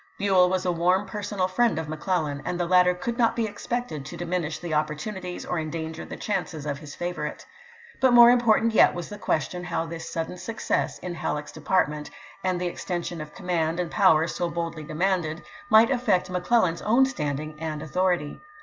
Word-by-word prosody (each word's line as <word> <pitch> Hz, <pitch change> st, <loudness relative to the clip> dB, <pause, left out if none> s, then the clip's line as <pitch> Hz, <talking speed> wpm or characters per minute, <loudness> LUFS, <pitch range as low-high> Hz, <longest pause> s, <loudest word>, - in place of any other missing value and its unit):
Buell 190 Hz, -3 st, +4 dB
was 185 Hz, 0 st, -1 dB
a 180 Hz, -, +2 dB
warm 180 Hz, +4 st, +2 dB
personal 200 Hz, -1 st, -2 dB
friend 230 Hz, +3 st, +2 dB
of 160 Hz, -1 st, -3 dB
McClellan, 155 Hz, -2 st, -2 dB
and 180 Hz, -, -3 dB
the 175 Hz, -, +1 dB
latter 180 Hz, 0 st, +4 dB
could 235 Hz, +7 st, -4 dB
not 230 Hz, -1 st, +3 dB
be 230 Hz, -, 0 dB
expected 220 Hz, -, -4 dB
to -, -, -8 dB
diminish 175 Hz, -2 st, -2 dB
the 170 Hz, -2 st, -5 dB
op 150 Hz, 0 st, +2 dB
portunities 180 Hz, +3 st, -6 dB
or 175 Hz, -, -1 dB
endanger 160 Hz, 0 st, -4 dB
the -, -, -8 dB
chances 180 Hz, -7 st, -3 dB
of 140 Hz, -2 st, -3 dB
his 150 Hz, -2 st, -10 dB
favorite. 175 Hz, -4 st, -4 dB, 0.5 s
But 260 Hz, -1 st, +4 dB
more 240 Hz, 0 st, +10 dB
important 230 Hz, -2 st, +3 dB
yet -, -, +6 dB
was 175 Hz, -2 st, -5 dB
the 205 Hz, -, -8 dB
question 180 Hz, +1 st, -1 dB
how 170 Hz, -2 st, -2 dB
this 165 Hz, 0 st, -7 dB
sudden 165 Hz, +2 st, -4 dB
success 225 Hz, +3 st, -2 dB
in 180 Hz, -1 st, -6 dB
Halleck's 150 Hz, -2 st, -3 dB
department, 150 Hz, -2 st, 0 dB, 0.3 s
and 185 Hz, -1 st, 0 dB
the 180 Hz, -, -2 dB
extension 175 Hz, -1 st, -4 dB
of 150 Hz, 0 st, -9 dB
command 170 Hz, -1 st, -1 dB
and 175 Hz, -2 st, -2 dB
power 165 Hz, -5 st, +5 dB
so 175 Hz, 0 st, -2 dB
boldly 170 Hz, -1 st, -4 dB
de 155 Hz, -, -7 dB
manded, 175 Hz, -2 st, 0 dB, 0.3 s
might 225 Hz, +3 st, +6 dB
affect 220 Hz, -9 st, +1 dB
McClellan's 180 Hz, -1 st, +1 dB
own 240 Hz, +5 st, +4 dB
standing 155 Hz, -, -3 dB
and 155 Hz, -1 st, -4 dB
authority. 175 Hz, -1 st, 0 dB
175 Hz, 190 wpm, -26 LUFS, 160-195 Hz, 0.5 s, more